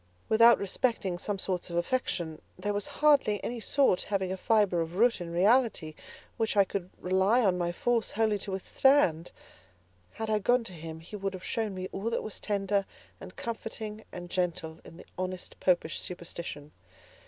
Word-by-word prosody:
Without 230 +2 +7
respecting 200 -3 -1
some 205 +1 -2
sorts 185 -1 -3
of 170 - -5
affection, 175 -5 -1 0.2
there 205 0 -2
was 205 0 -2 0.2
hardly 280 -9 +5
any 240 0 -3
sort 245 -5 +2
having 190 -2 -1
a - - -1
fibre 200 -3 +2
of 165 +1 -4
root 230 0 +3
in 170 - -5
reality, 195 -3 +2 0.4
which 225 -2 0
I 200 - +8
could 190 -1 -4
rely 190 +6 +3
on 180 -2 +2
my 175 0 0
force 230 +5 0
wholly 215 -1 +1
to 195 - -5
withstand. 190 - +3 0.8
Had 220 0 -4
I 215 -1 +2
gone 245 +4 +3
to 190 - -8
him, 160 -1 -8
he 175 +6 -10
would 195 -1 -3
have 185 - -9
shown 220 -4 -2
me 185 0 -4
all 200 +4 -2
that 230 - -1
was 215 - -6
tender, 200 -1 0 0.3
and 185 -1 -11
comforting, 220 -1 -5
and 175 0 -8
gentle, 165 -3 -2
in 165 - -13
the - - -12
honest 185 0 -5
Popish 175 -3 +1
superstition. 170 -4 -7
195 Hz, 175 wpm, -29 LUFS, 175-220 Hz, 0.8 s, I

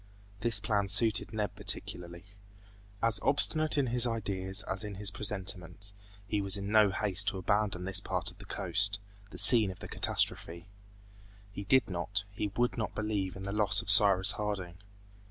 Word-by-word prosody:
This 110 0 +2
plan 100 -1 -2
suited 110 +2 +2
Neb 105 -4 -5
particularly. 85 0 -1 0.8
As 115 -2 +1
obstinate 150 +3 +3
in 140 - 0
his 120 0 0
ideas 100 -3 -2
as 95 +2 -4
in 105 -1 -8
his 100 0 -3
presentiments, 100 -1 -5 0.3
he 105 0 -3
was 100 +1 +1
in 100 +1 -7
no 110 -2 +3
haste 100 0 -1
to 100 - -3
abandon 95 -1 -3
this 95 +1 +4
part 95 +1 -1
of - - -23
the 100 - -13
coast, 100 +1 +2 0.3
the - - -13
scene 115 -5 +5
of 95 - -10
the - - -11
catastrophe. 85 +1 -2 0.9
He 100 0 -9
did 130 +5 +1
not, 90 +2 -4
he 105 +1 -5
would 120 0 -2
not 110 - -6
believe 105 -4 -4
in 95 - -10
the 100 - -6
loss 105 -1 0
of 100 - +4
Cyrus 100 -2 +7
Harding. 95 -5 -7
100 Hz, 170 wpm, -29 LUFS, 95-110 Hz, 0.9 s, Cyrus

